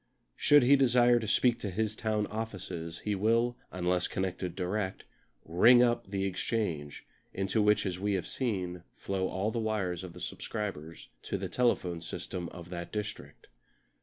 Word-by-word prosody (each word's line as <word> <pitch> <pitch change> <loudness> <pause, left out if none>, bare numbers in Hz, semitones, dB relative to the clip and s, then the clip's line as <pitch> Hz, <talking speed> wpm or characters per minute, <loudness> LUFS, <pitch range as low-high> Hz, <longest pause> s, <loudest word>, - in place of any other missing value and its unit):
Should 145 -2 +6
he 135 +3 +7
desire 120 -2 +5
to 110 - -4
speak 120 +3 +3
to 105 - -3
his 110 +3 -1
town 110 -1 0
offices 95 -7 -5
he 105 - +1
will, 115 +4 +2 0.2
unless 90 0 0
connected 90 -1 -3
direct, 95 +1 -2 0.4
"ring 120 +9 +6
up" 120 -2 +1
the 95 0 -2
Exchange, 90 -6 -2 0.3
into 95 +3 +1
which, 105 0 +3
as 90 -2 -2
we 100 +1 0
have 90 - -2
seen, 90 -8 -2
flow 95 -1 -2
all 95 +4 -1
the 115 - -2
wires 100 -5 -1
of 90 -2 -8
the - - -11
subscribers 90 -7 -5
to - - -3
the 95 0 -3
telephone 90 -7 +1
system 85 +1 -5
of 85 0 -11
that 85 -1 -5
district. 105 -1 -6
100 Hz, 165 wpm, -30 LUFS, 90-110 Hz, 0.4 s, he